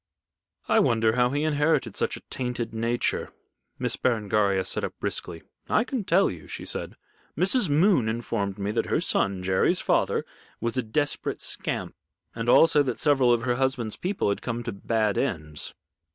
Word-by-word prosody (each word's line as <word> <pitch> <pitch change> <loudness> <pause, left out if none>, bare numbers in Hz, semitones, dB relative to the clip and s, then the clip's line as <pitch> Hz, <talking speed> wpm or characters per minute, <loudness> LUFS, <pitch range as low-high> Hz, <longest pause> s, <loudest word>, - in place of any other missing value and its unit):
I - - +4
wonder 110 -1 +3
how 125 0 +3
he 145 +3 -1
inherited 150 -7 +1
such - - -1
a - - -12
tainted 125 -2 -3
nature." 115 +2 -1 0.5
Miss - - -2
Berengaria 105 -5 +1
sat - - 0
up - - -3
briskly. 85 -2 -3 0.3
"I 215 - +3
can 245 -4 -3
tell 185 +3 +3
you," 80 -5 -10
she - - -7
said. - - -5 0.4
"Mrs. 190 - +2
Moon 150 - +3
informed 110 -4 -2
me 100 0 -2
that 115 - -1
her - - +1
son 95 -2 0
Jerry's 95 0 +2
father - - +1 0.3
was 115 +1 -2
a 130 - +2
desperate 140 +6 -1
scamp, - - -3 0.4
and 115 +1 -3
also 150 +2 +6
that 130 -4 -2
several 135 -5 +4
of 120 -1 +2
her 120 -1 0
husband's 130 -4 -1
people 185 - -1
had 100 - -1
come 120 -1 -3
to 115 - -3
bad 105 +1 0
ends." 75 - -3
120 Hz, 170 wpm, -26 LUFS, 105-145 Hz, 0.5 s, also